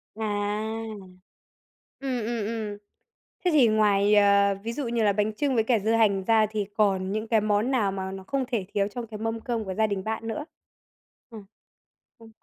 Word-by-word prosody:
À. 220 - -5 1.8
Ừm, 255 -4 -2
ừm, 230 -1 -2
ừm. 215 -2 -4 0.7
Thế 360 - +3
thì 285 -6 +6
ngoài, 210 -1 +3
ờ, 200 -1 +5
ví 230 - -3
dụ 265 0 -3
như 235 -1 0
là 205 - +4
bánh 210 +2 0
chưng 280 +3 0
với 225 -2 +2
cả 230 0 +2
dưa 215 +2 0
hành 200 -4 +3
ra 220 0 +4
thì 210 -2 -2
còn 195 -3 +1
những 215 +1 -3
cái 225 -1 +3
món 210 +3 +1
nào 220 -7 +1
mà 190 0 -4
nó 190 0 -8
không 270 +6 -1
thể 225 -8 -2
thiếu 200 -1 +1
trong 230 +3 -6
cái 215 -1 -8
mâm 225 +1 -3
cơm 230 -1 -3
của 190 -2 -4
gia 220 +3 +2
đình 200 -3 -3
bạn 220 +1 -3
nữa? 290 +7 -3 0.9
Ờ, 225 - -9 0.8
ừ. 225 -1 -15
215 Hz, 200 wpm, -26 LUFS, 205-230 Hz, 1.8 s, thì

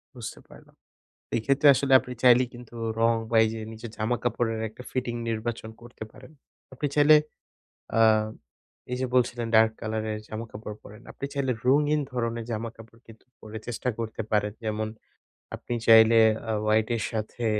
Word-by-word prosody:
বুঝতে - - -8
পারলাম। - - -17 0.6
এই - - +1
ক্ষেত্রে 140 +3 +2
আসলে 135 0 0
আপনি 125 - -9
চাইলেই 125 0 +6
কিন্তু 120 -1 -12 0.3
রং 115 0 +4 0.2
বা 115 - +1
এই 110 - +1
যে 110 - -6
নিজের 110 +1 -9
জামা 110 +3 0
কাপড়ের 115 -1 -1
একটা 110 - -12
ফিটিং 125 -2 -2
নির্বাচন 115 0 -4
করতে 120 -2 -10
পারেন। 130 +3 -15 0.4
আপনি 130 +3 -3
চাইলে 150 +1 +7 0.8
আ - - +4 0.9
এই - - 0
যে 130 - 0
বলছিলেন 120 -2 +1
ডার্ক 110 0 +5
কালার 110 0 -3
এর 105 - -5
জামা 110 +1 -6
কাপড় 105 0 -8
পরেন। 105 +3 -13
আপনি 140 - -5
চাইলে 135 -2 0
রঙিন 150 +3 +3
ধরনের 115 -1 -2
জামাকাপড় 115 0 -7
কিন্তু 115 -1 -16 0.2
পরে 110 0 -8
চেষ্টা 120 +1 -4
করতে 115 0 -4
পারেন। 105 -1 +1
যেমন 110 0 -2 0.7
আপনি 120 - -6
চাইলে 115 0 +7 0.3
আ - - +1
হোয়াইট 110 0 +2
এর - - -3
সাথে 110 +2 -4
115 Hz, 165 wpm, -26 LUFS, 110-125 Hz, 0.9 s, চাইলে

